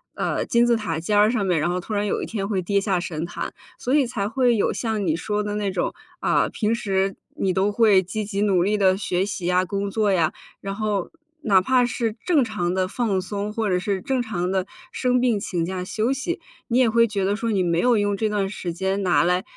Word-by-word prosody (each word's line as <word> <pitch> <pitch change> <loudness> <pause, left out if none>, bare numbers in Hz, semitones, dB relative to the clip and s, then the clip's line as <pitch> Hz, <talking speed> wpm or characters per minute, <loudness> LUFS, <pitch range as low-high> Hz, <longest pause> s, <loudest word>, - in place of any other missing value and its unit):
呃， - - -1
金 235 0 +3
字 240 - +4
塔 170 -8 -2
尖 205 +6 0
儿 210 +1 +6
上 220 -5 0
面， 180 -4 +2
然 170 - +1
后 180 +1 -1
突 215 - -6
然 205 0 0
有 - - -1
一 - - -2
天 200 -3 -3
会 195 -3 0
跌 200 +2 +1
下 195 -3 0
神 165 -2 -4
坛， 170 - -5 0.2
所 255 - -2
以 290 -3 +4
才 215 -4 -2
会 250 0 +2
有 200 - +1
像 220 -4 -2
你 155 - +2
说 210 +5 -2
的 205 0 -3
那 205 -2 -1
种， 185 - -1 0.3
啊， - - +2
平 220 +1 0
时 195 -4 0 0.2
你 190 -1 +1
都 195 +3 +1
会 205 -3 +4
积 210 +4 -4
极 200 -1 -3
努 195 -4 +3
力 210 +3 +1
地 190 -2 +3
学 185 -2 0
习 200 -3 -5
呀、 180 +1 +3
工 200 +2 -2
作 210 -1 +1
呀， 170 -3 +2 0.3
然 195 0 -4
后 210 -3 -1 0.3
哪 200 -9 +4
怕 250 +5 +3
是 230 -2 -1
正 320 -7 +4
常 180 -6 -2
地 185 0 0
放 205 -2 0
松， 200 +3 -4
或 220 -1 -1
者 180 - +2
是 195 0 -2
正 260 +5 0
常 190 -6 -2
地 190 -1 0 0.3
生 250 -1 +1
病 245 -3 +2
请 175 -4 -2
假 185 +1 -4
休 220 +6 -1
息， 275 +8 -3 0.3
你 240 - +1
也 250 -3 +4
会 230 +1 +4
觉 205 -3 -2
得 200 +1 +1
说 230 +1 -2
你 200 -3 +1
没 170 -2 +1
有 245 -2 +4
用 205 -1 +1
这 220 +1 0
段 205 -2 0
时 185 -3 -4
间 190 +3 -1
拿 180 -2 +3
来， 180 +2 +1
200 Hz, 265 characters per minute, -23 LUFS, 185-225 Hz, 0.3 s, 儿